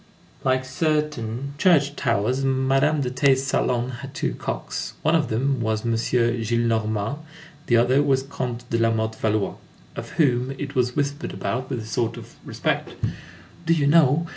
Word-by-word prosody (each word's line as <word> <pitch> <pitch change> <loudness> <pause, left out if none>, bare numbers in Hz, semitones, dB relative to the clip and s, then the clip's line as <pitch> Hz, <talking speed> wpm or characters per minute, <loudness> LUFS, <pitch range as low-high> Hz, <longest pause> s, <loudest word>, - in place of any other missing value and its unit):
Like 130 -1 +1
certain 140 -3 -1
church 145 -6 +4
towers, 125 +1 0
Madame 135 +3 +2
de 125 -2 -1
T.'s 130 0 +3
salon 125 -2 0
had 135 -1 -9
two - - -1
cocks. - - -4
One 155 - +3
of 160 -3 +3
them 130 +3 0
was 110 0 -1
M. 115 - +1
Gillenormand, 115 0 0 0.5
the 120 - +4
other 125 +4 +4
was 135 -2 +2
Comte 125 -3 -5
de 115 - +1
Lamothe 110 -1 0
Valois, 110 -2 0 0.4
of - - -6
whom 130 -3 +1
it 145 -1 -5
was 125 -2 +1
whispered 145 +1 -2
about, 130 +2 -3
with 125 -4 -3
a - - -8
sort 115 +1 -1
of - - -11
respect: - - -2 0.7
"Do 165 - +5
you 150 -3 +1
know? 155 +1 +4
130 Hz, 160 wpm, -24 LUFS, 115-140 Hz, 0.7 s, Do